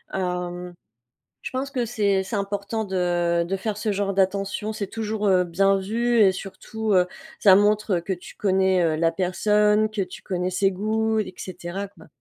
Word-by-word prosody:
Hem, 180 -1 -3 0.7
je - - -5
pense 265 +2 -3
que 255 -3 -1
c'est 200 -4 +1
c'est 190 +4 -5
important 200 +2 -2
de 175 -2 +1
de 180 +3 -2
faire 205 +2 -3
ce 210 0 -1
genre 200 -1 -1
d'attention. 195 +2 0
C'est 200 -2 -4
toujours, 215 -1 -2
heu, 185 -2 +4
bien 195 +3 +2
vu 235 +5 0
et 200 -3 +6
surtout, 215 +3 -4
heu, 180 -1 +5 0.3
ça 195 -3 +7
montre 205 -2 +2
que 180 +3 -3
tu 180 - -11
connais, 190 -2 +2
heu, 160 -2 +2
la 165 +1 +2
personne, 210 +4 +2
que 215 -2 -2
tu 180 -1 -7
connais 180 -1 -2
ses 195 +1 +1
goûts 220 +3 0
et 210 - -3
cetera, 185 +2 -6
quoi. 180 -5 -18
195 Hz, 180 wpm, -24 LUFS, 180-210 Hz, 0.7 s, ça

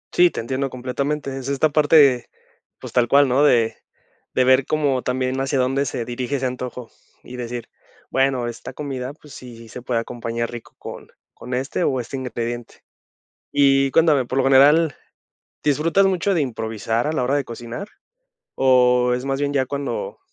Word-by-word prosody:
Sí, 175 0 +6
te - - -5
entiendo 130 +4 -2
completamente. 135 +3 -3
Es 135 -1 -6
esta 140 +3 +2
parte, 145 -4 +4 0.5
pues, - - -9
tal 120 -1 +3
cual, 140 +2 +5
¿no? 130 +4 +3
De 115 -6 +3 0.6
de 130 - +4
ver 130 +1 +4
como 145 -4 +1
también 130 +1 -1
hacia 135 +1 -1
dónde 135 +2 +1
se 115 - -3
dirige 125 +3 -3
ese 130 - -3
antojo, 125 -1 -6 0.3
y 125 - -10
decir, 120 -1 -6 0.4
bueno, 135 -2 +1
esta 120 - -7
comida, 135 -3 -5
pues, 150 -1 -16
sí, 125 -2 -11
sí 115 -1 -13
se 125 - -8
puede 120 -2 0
acompañar 115 0 -4
rico 120 -1 -10
con - - -9 0.3
con 125 +1 -8
este 135 +7 -2
o 130 -4 +1
este 125 +3 -5
ingrediente. 120 -2 -5 0.7
Y 135 -1 +4
cuéntame, 155 -5 +4
por 130 +2 -3
lo 135 - +3
general, 145 +3 +5 0.7
¿disfrutas 165 +7 +3
mucho 190 +1 +1
de 165 - +1
improvisar 115 -2 -2
a 155 - -1
la 140 - -1
hora 135 +3 +1
de 140 - -1
cocinar 120 - -7 0.7
o 125 -1 +4
es 125 +1 -4
más 135 0 -2
bien 145 0 0
ya 130 - +2
cuando 140 -3 -4
130 Hz, 175 wpm, -21 LUFS, 125-140 Hz, 0.7 s, Sí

